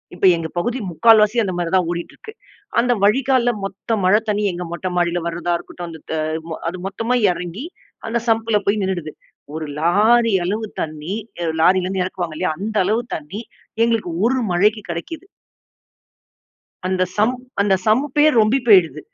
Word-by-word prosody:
இப்ப 185 - 0
எங்க 165 -1 -4
பகுதி 240 +8 -1
முக்கால்வாசி 215 +4 +4
அந்தமாரி 175 -3 -2
தான் 180 -2 +3
ஓடிட்டு 170 0 -5
இருக்கு. 435 - -11 0.5
அந்த 245 +1 +3
வழிகால்ல 245 +2 +3
மொத்த 195 +3 -4
மழை 195 +4 +5
தண்ணி, 210 0 0
எங்க 175 +1 -5
மொட்டை 185 +2 -3
மாடில 175 0 +1
வர்றத 170 +1 -5
இருக்கட்டும். 175 0 -9
அந்த 160 -1 -10
த - - -1 0.6
அது 185 - -7
மொத்தமா 225 +5 -1 0.2
இறங்கி, 180 - -6 0.4
அந்த 235 +1 0
சம்ப்ல 225 -1 +2
போய் 210 +1 +1
நின்னுடுது. 175 -5 -3 0.4
ஒரு 160 -1 -4
லாரி 215 +7 +3
அளவு 215 +4 -2
தண்ணி, 155 +3 -5 0.3
அ - - -1 0.2
லாரிலேருந்து 185 +1 +2
இறக்குவாங்க 175 -4 -4
இல்லயா 155 - 0
அந்த 215 +1 -3
அளவு 220 +4 +1
தண்ணீ 160 +9 -7 0.4
எங்களுக்கு 225 -7 -1
ஒரு 260 +2 +2
மழைக்கு 210 +4 +2
கிடைக்கிது. 320 - -6 1.6
அந்த 185 0 0 0.2
சம்ப் 245 +4 +2 0.2
அந்த 200 -1 +3
சம்ப்பே 280 +6 +3 0.2
ரொம்பி 220 +6 +3
போயிடுது. 185 -7 +5
200 Hz, 150 wpm, -20 LUFS, 175-225 Hz, 1.6 s, மழை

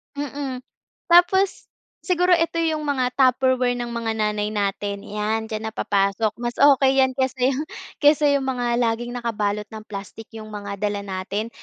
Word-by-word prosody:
Mm, 280 -2 -4 0.5
tapos 365 +3 +4 0.4
siguro 360 -1 +2
eto 335 0 0
yung 315 -2 -1
mga 260 -3 0
tupperware 255 -1 +3
ng 240 -1 -4
mga 235 -1 -2
nanay 210 -1 -1
natin, 200 0 -2
yan, 215 +2 -3
diyan 215 0 -4
na 220 - -4
napapasok, 200 +1 0
mas 240 0 -3
okey 270 -1 +5
yan 260 0 +1
kaysa 260 -1 -1
yung 275 +3 -1 0.3
kaysa 295 0 +4
yung 270 - -4
mga 245 -2 -1
laging 240 0 0
nakabalot 210 -3 -2
ng 220 - -7
plastic, 205 +2 -8
yung 215 -1 -9
mga 200 -1 -6
dala 205 0 -2
natin. 200 +3 -4
235 Hz, 160 wpm, -23 LUFS, 210-270 Hz, 0.5 s, okey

